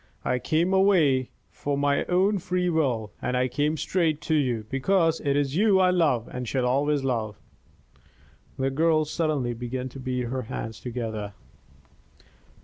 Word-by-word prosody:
I 125 - +1
came 170 +7 +1
away 165 -10 +3 0.3
of 140 -1 0
my 140 0 +1
own 190 +3 +2
free 180 -1 -1
will; 125 -10 0
and 125 - -1
I 125 0 +2
came 145 +4 0
straight 160 -3 0
to 160 - -2
you 125 -8 0
because 165 +4 +2
it 140 -1 0
is 140 -1 0
you 200 0 +4
I 185 -1 +4
love 150 -10 +1
and 125 -1 -5
shall 130 +1 0
always 140 +3 +1
love." 115 -6 -2 1.2
The 135 0 0
girl 155 +2 +2
suddenly 150 -6 -1
began 125 +2 -4
to 135 - -10
beat 130 -1 -2
her 125 +2 -3
hands 110 -1 -6
together. 110 -4 -5
140 Hz, 155 wpm, -26 LUFS, 125-165 Hz, 1.2 s, you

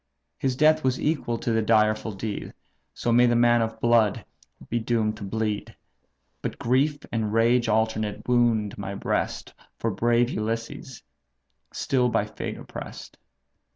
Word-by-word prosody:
His 130 -2 0
death 155 +3 +4
was 130 -1 +1
equal 145 -6 -1
to 115 - -2
the 110 0 +2
direful 110 0 +2
deed; 100 +1 -5 0.4
So 120 - -1
may 120 +1 +5
the 120 - +3
man 120 0 +4
of 110 0 -3
blood 115 -3 +3 0.4
be 120 - -1
doomed 110 -2 0
to 105 - -8
bleed! 105 +1 -3 0.7
But - - -4
grief 135 +5 +1
and 110 -2 -1
rage 115 +1 +3
alternate 110 -1 0
wound 115 -4 +2
my 100 0 -4
breast - - -2 0.2
For 115 - -1
brave 120 +4 +2
Ulysses, 115 +4 -4 0.7
still 125 -2 +1
by 105 - +1
fate 105 0 -6
oppress'd. - - -9
115 Hz, 145 wpm, -25 LUFS, 110-120 Hz, 0.7 s, may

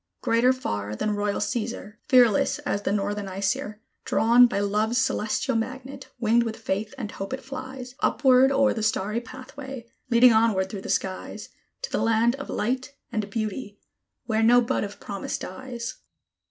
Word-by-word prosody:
Greater 235 +3 +4
far 105 - -3
than 210 - -1
royal 205 0 -1
Cæsar, 210 0 -3
Fearless 245 -5 +4
as 200 - -1
the 200 - -1
northern 205 0 -1
Æsir, 195 +2 -2 0.3
Drawn 240 +2 +5
by 230 - -2
Love's 210 +3 0
celestial 225 +3 0
magnet, 260 +3 -4
winged 235 0 +3
with 225 -1 -3
faith 215 +2 -3
and 225 -6 -5
hope 195 +6 -6
it 265 - -5
flies, 260 -2 -7
Upward 265 -2 +4
o'er 275 -1 +3
the 220 - -4
starry 215 +1 0
pathway, 260 +1 -9 0.2
leading 235 0 +6
onward 215 -4 +2
through 200 - -5
the - - -8
skies, 190 -1 -3 0.3
To - - -4
the - - 0
land 230 +1 +3
of 275 - -8
Light 255 +5 -2 0.2
and 215 -3 -2
Beauty, 215 0 -4 0.5
where 220 -1 0
no 240 +2 +6
bud 235 - 0
of 205 0 -7
promise 200 -1 -4
dies. 240 +4 -6
230 Hz, 165 wpm, -25 LUFS, 205-255 Hz, 0.5 s, leading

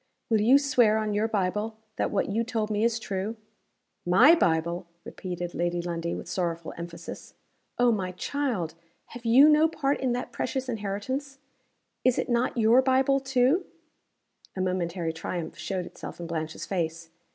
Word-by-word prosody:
"Will 220 -2 +4
you 245 +6 +6
swear 245 -6 +3
on 215 -1 -1
your 210 +2 +1
Bible, 210 +1 -1 0.2
that - - 0
what 200 - 0
you 220 +3 0
told 220 -2 -2
me 210 +1 +1
is 230 0 +2
true?" 205 0 -3 0.7
"My 230 - +7
Bible!" 170 - +1 0.2
repeated 175 -1 -6
Lady 175 0 -1
Lundie 170 -1 -3
with - - -7
sorrowful 170 -2 -3
emphasis. 170 0 -8 0.4
"Oh, 245 0 +4
my 190 -4 -1
child! 215 - -2 0.4
have 240 0 -10
you 255 +6 +7
no 305 +1 +6
part 290 -3 -1
in 260 -2 0
that 245 - -4
precious 265 0 -3
inheritance? 245 +6 -3 0.7
Is 255 -1 +3
it - - -1
not 240 +1 +1
your 230 +3 +5
Bible, 265 +1 +3
too?" 265 +6 +2 0.9
A 190 - -2
momentary 175 -2 -1
triumph 165 0 -5
showed 185 -2 -3
itself - - -9
in 170 - -5
Blanche's 160 -1 -4
face. 165 -3 -3
210 Hz, 160 wpm, -27 LUFS, 175-255 Hz, 0.9 s, My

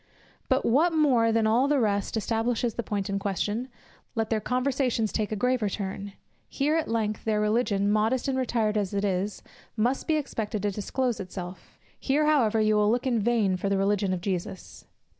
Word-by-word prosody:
But 260 0 +2
what 315 +9 +3
more 255 -8 +3
than 225 -1 +2
all 235 +5 +3
the 290 -1 +2
rest 205 -1 0
establishes 225 +1 0
the 235 - -3
point 205 -3 -3
in 200 -1 -1
question: 205 +5 -2 0.5
let 225 -1 -1
their 220 - +2
conversation 250 0 0
take 215 0 -2
a - - 0
graver 245 -1 +1
turn: 200 0 -5 0.4
here 295 +3 0
at 325 - 0
length 215 -2 -1
their 215 -1 +1
religion, 210 -2 +1
modest 225 +5 +1
and 270 - 0
retired 230 -4 0
as 200 -1 -1
it 200 +1 0
is, 195 +1 -2 0.3
must 245 +5 0
be 320 - +2
expected 220 -8 -3
to 205 - +1
disclose 235 +4 -2
itself; 185 -1 -8 0.2
here 290 +3 +1
however 245 -8 +3
you 215 0 +3
will 210 0 +3
look 245 +4 0
in 245 -3 +1
vain 210 -4 +1
for 195 +2 -2
the 200 - +1
religion 195 0 +1
of 185 -2 -2
Jesus. 185 -1 -5
220 Hz, 190 wpm, -27 LUFS, 205-250 Hz, 0.5 s, what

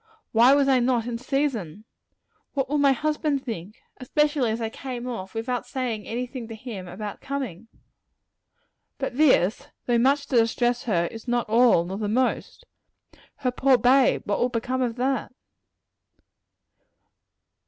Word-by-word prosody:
Why 240 +4 +6
was 280 -1 +3
I 265 -2 +4
not 240 -2 +1
in 235 -1 -4
season? 235 - -2 0.7
What 270 -1 0
will 295 +2 0
my 280 -1 +5
husband 300 0 -1
think 215 -3 -6 0.2
especially 290 -1 +1
as 220 +1 -2
I 225 - -1
came 250 -2 -6
off 195 -5 -6
without 245 +2 -3
saying 240 -5 -3
any 245 +2 -2
thing 245 -2 -8
to 225 - -8
him 215 -5 -8
about 205 +4 -7
coming? 255 -8 -5 1.3
But 270 -3 -4
this, 255 - +3 0.2
though 240 -1 +2
much 280 +4 +2
to 255 - +2
distress 240 +1 +1
her, 175 -7 +1
is 225 +1 -10
not 240 -1 0
all, 225 -6 +4
nor 190 +3 -5
the 210 -1 -2
most. 255 - -1 0.7
Her 255 -3 -1
poor 260 +1 +3
bade! 255 +2 +4
what 205 - -1
will 245 - +2
become 250 +2 -2
of 240 -3 -1
that? 260 +1 -1
245 Hz, 155 wpm, -25 LUFS, 225-265 Hz, 1.3 s, Why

